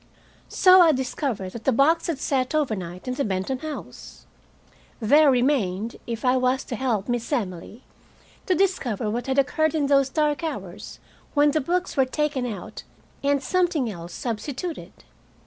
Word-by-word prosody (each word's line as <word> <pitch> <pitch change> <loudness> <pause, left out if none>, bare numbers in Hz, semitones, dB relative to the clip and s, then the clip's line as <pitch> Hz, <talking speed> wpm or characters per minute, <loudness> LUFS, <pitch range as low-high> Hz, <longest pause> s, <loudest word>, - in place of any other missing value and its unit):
So 370 0 +6
I 330 -3 +6
discovered 255 -7 -3
that 230 +2 -9
the 265 - +4
box 305 +7 +3
had 330 -4 -1
sat 265 0 -1
overnight 190 - -2
in 255 - -1
the 280 +2 -1
Benton 200 +5 -2
house. 310 +1 -9 0.7
There 290 +6 +5
remained, 240 -6 +1
if 230 +1 -4
I 255 +1 +4
was 255 +1 +1
to 245 - -5
help 230 -5 -1
Miss 240 0 -2
Emily, 210 - -4 0.6
to 370 - +3
discover 255 - 0
what 240 +4 -3
had 265 0 -1
occurred 315 +3 +2
in 300 -2 +1
those 275 -1 +3
dark 300 +2 0
hours 200 - -6 0.4
when 290 0 +5
the 310 +1 +1
books 355 +6 -1
were 265 -3 +4
taken 280 -1 -1
out 205 -6 -7 0.4
and 280 0 +1
something 340 -10 +1
else 170 -2 -9
substituted. 260 +8 -5
265 Hz, 160 wpm, -24 LUFS, 230-300 Hz, 0.7 s, So